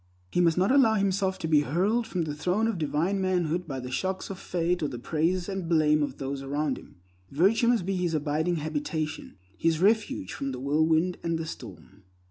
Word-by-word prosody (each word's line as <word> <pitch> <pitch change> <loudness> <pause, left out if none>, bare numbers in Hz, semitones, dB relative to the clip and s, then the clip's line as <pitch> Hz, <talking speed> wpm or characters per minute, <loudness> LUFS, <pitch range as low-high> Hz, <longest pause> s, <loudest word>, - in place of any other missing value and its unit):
He 175 - +2
must 170 -1 +3
not 190 +6 +3
allow 265 -5 +5
himself 195 -1 +1
to 160 - -4
be 155 -2 +5
hurled 200 - 0
from 185 -6 -1
the 150 -2 -3
throne 180 +8 0
of 225 -6 -1
divine 165 +6 0
manhood 180 -2 0
by 135 -3 -4
the 125 0 -7
shocks 190 +8 -2
of 190 - -7
fate 175 0 -1
or 150 - +1
the 130 -3 -6
praise 165 +7 0
and 190 -4 -4
blame 155 -2 +4
of 145 - -2
those 135 0 -4
around 140 0 -2
him. - - -17 0.3
Virtue 200 - +3
must 235 -7 +2
be 195 0 -1
his 175 -3 0
abiding 155 +3 0
habitation; 155 - -3 0.2
his 165 -1 +2
refuge 205 - +1
from 135 -1 -4
the 125 - -5
whirlwind 160 +5 +1
and 165 -1 -1
the 160 - -4
storm. 95 - -10
165 Hz, 205 wpm, -27 LUFS, 150-190 Hz, 0.3 s, allow